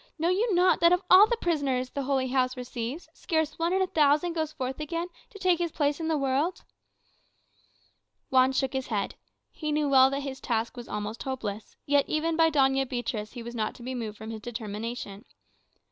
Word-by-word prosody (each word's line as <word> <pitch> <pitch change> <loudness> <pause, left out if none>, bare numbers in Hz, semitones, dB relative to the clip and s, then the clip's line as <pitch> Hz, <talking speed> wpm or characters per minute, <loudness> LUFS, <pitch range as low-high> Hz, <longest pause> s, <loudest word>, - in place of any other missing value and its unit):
Know 330 +2 +1
you 400 +2 +1
not 360 +1 +4
that 340 0 +5
of 360 +1 +3
all 385 +3 +9
the 475 - 0
prisoners 275 - -1
the 280 - -3
Holy 265 -1 0
House 255 -1 +1
receives, 250 +4 -5
scarce 315 -3 -2
one 335 +1 +1
in 380 +1 +2
a - - +2
thousand 305 0 +2
goes 315 -2 -2
forth 265 -2 -4
again 335 +3 -3 0.2
to 450 - -12
take 365 -3 +2
his 340 -2 -1
place 290 0 0
in 325 - -2
the 320 -1 +1
world?" 275 +6 0 1.7
Juan 260 0 +5
shook 265 0 -1
his 265 -1 -2
head. 205 -4 -2 0.4
He 305 -2 -4
knew 300 0 +1
well 265 -1 +6
that 275 +1 -2
his 270 -1 -6
task 230 0 -1
was 240 -1 -8
almost 210 +2 -4
hopeless; 220 -6 -5
yet, 285 0 +2
even 320 +1 0
by 325 0 +4
Doña 270 -3 +2
Beatriz, 230 -4 -3
he 240 -2 -7
was 235 +1 -7
not 220 -3 -2
to 240 - -12
be 260 +2 -4
moved 220 -4 -5
from 220 +1 -7
his 220 -1 -7
determination. 220 -2 -6
270 Hz, 205 wpm, -28 LUFS, 245-325 Hz, 1.7 s, all